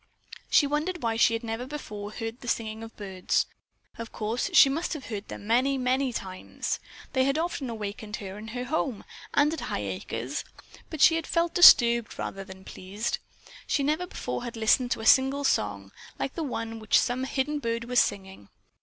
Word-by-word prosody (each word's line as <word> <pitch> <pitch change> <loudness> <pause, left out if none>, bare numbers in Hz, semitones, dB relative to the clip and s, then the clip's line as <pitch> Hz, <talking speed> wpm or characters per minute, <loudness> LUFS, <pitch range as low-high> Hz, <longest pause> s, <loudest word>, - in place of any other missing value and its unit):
She 290 - +5
wondered 305 +4 -2
why 225 -1 0
she 230 0 +4
had 230 - -5
never 230 +2 -4
before 210 -8 -7
heard 225 +2 -5
the 245 - -9
singing 220 -1 -2
of 225 0 -10
birds. 190 -3 -1 0.5
Of 230 -1 -6
course, 225 - -2
she 325 -5 +8
must 305 +5 -1
have 300 -5 -7
heard 210 -2 -5
them - - -8
many, 255 +5 +2
many 260 +1 +1
times. 185 -5 -4 0.3
They 260 - +3
had 275 +2 +1
often 320 -5 -2
awakened 210 -1 -5
her 195 -2 -7
in 220 - -9
her 245 +2 -4
home, 260 -4 -2 0.3
and 295 +2 +4
at 325 - -4
Highacres, 105 +6 -4 0.5
but 315 -3 -5
she 325 - +7
had 325 - -4
felt 335 0 +1
disturbed 235 - +7
rather 195 - -5
than 190 -1 -12
pleased. 200 +5 -4 0.5
She 280 - +1
never 310 +5 0
before 125 - -4
had 235 -1 -6
listened 225 +3 +3
to 230 - -1
a - - -6
single 270 +4 +5
song, 100 - 0 0.3
like 275 - -3
the 335 - -4
one 230 -6 -4
which 220 -1 +3
some 255 +2 -1
hidden 280 +3 -1
bird 230 -3 -2
was 245 +1 +2
singing. 190 - -2
235 Hz, 190 wpm, -27 LUFS, 210-275 Hz, 0.5 s, she